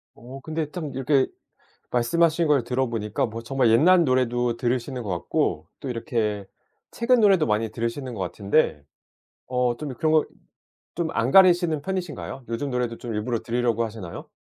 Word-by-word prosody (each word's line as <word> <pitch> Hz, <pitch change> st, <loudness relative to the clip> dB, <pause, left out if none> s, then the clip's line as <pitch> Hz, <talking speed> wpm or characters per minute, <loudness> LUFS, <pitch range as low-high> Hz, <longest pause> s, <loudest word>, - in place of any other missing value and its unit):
어 125 Hz, +4 st, -10 dB
근데 155 Hz, +1 st, -3 dB
참 160 Hz, -6 st, -5 dB
이렇게 135 Hz, +1 st, +2 dB, 0.6 s
말씀하신 165 Hz, +7 st, +2 dB
걸 145 Hz, -5 st, +3 dB
들어 130 Hz, +2 st, 0 dB
보니까 110 Hz, 0 st, -1 dB
뭐 115 Hz, 0 st, -7 dB
정말 125 Hz, 0 st, +1 dB
옛날 170 Hz, +10 st, +5 dB
노래도 125 Hz, -3 st, +1 dB
들으시는 125 Hz, +1 st, -2 dB
것 105 Hz, -, -7 dB
같고 85 Hz, -3 st, -1 dB
또 140 Hz, -, -6 dB
이렇게 110 Hz, -5 st, -2 dB, 0.4 s
최근 240 Hz, +1 st, +2 dB
노래도 195 Hz, -7 st, +4 dB
많이 110 Hz, +1 st, 0 dB
들으시는 120 Hz, +2 st, -4 dB
것 105 Hz, -, -7 dB
같은데 100 Hz, -, 0 dB, 0.7 s
어 125 Hz, -1 st, 0 dB
좀 145 Hz, +2 st, -6 dB
이 -, -, -6 dB
그런 155 Hz, +5 st, 0 dB
거 155 Hz, -, +4 dB, 0.7 s
좀 170 Hz, -1 st, -1 dB
안 115 Hz, +3 st, 0 dB
가리시는 175 Hz, -5 st, +5 dB
편이신가요? 175 Hz, -7 st, -5 dB
요즘 115 Hz, +5 st, -2 dB
노래도 125 Hz, -2 st, -2 dB
좀 115 Hz, -3 st, -5 dB
일부러 115 Hz, +2 st, -1 dB
들으려고 120 Hz, -1 st, 0 dB
하시나요? 105 Hz, -6 st, -7 dB
125 Hz, 355 characters per minute, -24 LUFS, 115-155 Hz, 0.7 s, 옛날